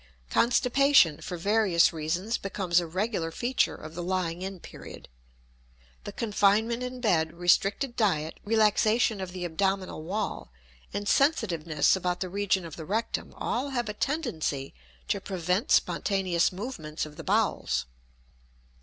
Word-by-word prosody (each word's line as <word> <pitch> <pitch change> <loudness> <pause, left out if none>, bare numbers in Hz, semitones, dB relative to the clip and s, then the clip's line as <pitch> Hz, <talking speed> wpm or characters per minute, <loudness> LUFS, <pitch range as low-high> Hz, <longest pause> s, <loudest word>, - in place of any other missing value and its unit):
Constipation, 250 - +4
for 180 - -5
various 195 -2 +3
reasons, 170 +8 -2
becomes 190 -3 +1
a 170 - -4
regular 185 0 -2
feature 245 +9 0
of 155 +1 -10
the 175 - -5
lying 180 -1 -2
in 190 0 -5
period. - - -11 1.0
The - - -5
confinement 220 +2 +1
in 250 0 -5
bed, 160 -8 +2
restricted 195 +8 +1
diet, 160 -8 0
relaxation 220 0 +2
of 185 -1 -5
the 180 -1 -5
abdominal 190 +1 -1
wall, 190 - -4 0.4
and 205 +1 -4
sensitiveness 180 - +2
about 180 -1 -2
the 185 - -3
region 195 -1 0
of 160 - -9
the 160 - -7
rectum, 220 +7 -2
all 265 +4 -2
have 240 -5 -2
a - - -3
tendency 210 - -2 0.3
to - - -1
prevent 185 +1 -1
spontaneous 180 -1 +2
movements 180 -8 -5
of 150 -1 -11
the - - -8
bowels. - - 0
190 Hz, 135 wpm, -28 LUFS, 170-220 Hz, 1.0 s, Constipation